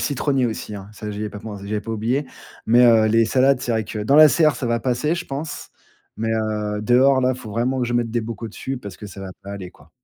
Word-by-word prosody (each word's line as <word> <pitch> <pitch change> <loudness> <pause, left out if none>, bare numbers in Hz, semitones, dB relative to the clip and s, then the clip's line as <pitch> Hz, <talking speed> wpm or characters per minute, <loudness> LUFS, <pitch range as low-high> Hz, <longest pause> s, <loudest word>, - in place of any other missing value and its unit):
citronnier 135 -2 0
aussi, 110 -2 -5
hein, 100 -1 -8
ça 105 0 -8
j'y 105 - -5
ai 105 - -2
pas 105 - -8
pen 105 0 -7
j'avais 105 +2 -3
pas 115 +2 -6
oublié. 120 +6 -1 0.4
Mais, 120 +2 +6
heu, 115 -2 +6
les 115 +1 +4
salades, 130 +3 +3
c'est 125 - -3
vrai 110 -1 0
que 105 +1 -5
dans 125 +7 +3
la 155 0 +9
serre, 155 +2 +3
ça 130 - -3
va 115 0 0
passer, 125 +6 0
je 175 0 -5
pense, 145 +2 -6 0.5
mais, 115 +1 -2
heu, 105 -1 -2
dehors 130 +4 +4
là, 130 0 +2
il - - -11
faut 110 - -9
vraiment 125 +5 -1
que 125 - 0
je 120 - -3
mette 120 -1 0
des 120 +1 0
bocaux 115 0 -6
dessus 130 +5 -5
parce 100 -6 -9
que 105 - -9
ça 100 -1 -10
va 95 -1 -7
pas 100 - -8
aller, 95 -3 -7
quoi. - - -22
115 Hz, 275 wpm, -21 LUFS, 105-130 Hz, 0.5 s, la